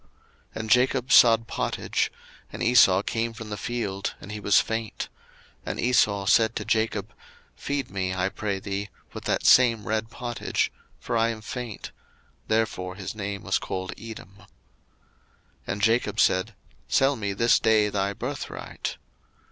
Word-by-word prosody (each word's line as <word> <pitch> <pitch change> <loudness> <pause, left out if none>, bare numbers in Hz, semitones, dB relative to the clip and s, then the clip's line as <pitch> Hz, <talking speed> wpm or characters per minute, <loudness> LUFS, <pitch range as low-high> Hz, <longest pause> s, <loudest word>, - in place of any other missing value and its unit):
01:025:029 - - -33 0.5
And 110 0 -5
Jacob 125 +1 +3
sod 115 -1 +7
pottage: - - -1 0.4
and - - -5
Esau 100 -5 +5
came 115 +1 -2
from 115 -2 -9
the - - -2
field, 105 -4 -3
and 100 - -10
he 105 - -5
was 100 -1 +4
faint: 110 -1 -3 0.6
01:025:030 - - 0
And - - -7
Esau 105 -5 +2
said 110 +3 +4
to - - -3
Jacob, 110 -2 -1 0.4
Feed 140 -3 -3
me, 95 -1 -2
I 95 0 0
pray 100 -1 -3
thee, 100 +1 -4 0.2
with - - -8
that - - 0
same 115 -4 +5
red 110 +1 -1
pottage; 120 0 -2 0.3
for - - -4
I 115 0 +3
am 110 -1 -5
faint: 120 -1 -6 0.6
therefore 110 -5 0
was - - -14
his 95 - -4
name 100 -1 -5
called 95 0 -4
Edom. 110 -4 -10
01:025:031 100 - -18 1.2
And 100 +1 -3
Jacob 115 -1 +2
said, 95 +4 +2 0.3
Sell 135 +1 +3
me 100 -4 -3
this 115 +4 +4
day 110 -2 +3
thy 100 0 -1
birthright. - - -5
110 Hz, 155 wpm, -26 LUFS, 100-115 Hz, 1.2 s, sod